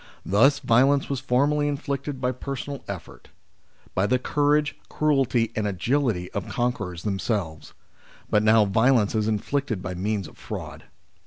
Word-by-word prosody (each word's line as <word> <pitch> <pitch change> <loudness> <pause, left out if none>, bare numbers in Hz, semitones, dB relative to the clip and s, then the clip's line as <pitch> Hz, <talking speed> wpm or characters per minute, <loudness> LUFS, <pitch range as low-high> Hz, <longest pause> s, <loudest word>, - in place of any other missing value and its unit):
Thus 115 +9 +4
violence 135 +4 +3
was 135 - -1
formerly 145 +4 +1
inflicted 140 -1 -3
by 125 -1 0
personal 135 +2 -6
effort: 90 -11 -8 0.7
by 95 +2 +1
the 125 - +3
courage, 150 +3 +1
cruelty, 130 -6 +1
and 110 -1 0
agility 105 -1 0
of 100 - -3
the - - -9
conquerors 105 -9 -2
themselves; 95 -6 -3 0.5
but 105 - +3
now 110 0 +5
violence 110 +1 +3
is 110 -1 0
inflicted 110 -1 -1
by 90 - -4
means 100 0 -2
of - - -17
fraud. - - -7
120 Hz, 145 wpm, -25 LUFS, 100-140 Hz, 0.7 s, now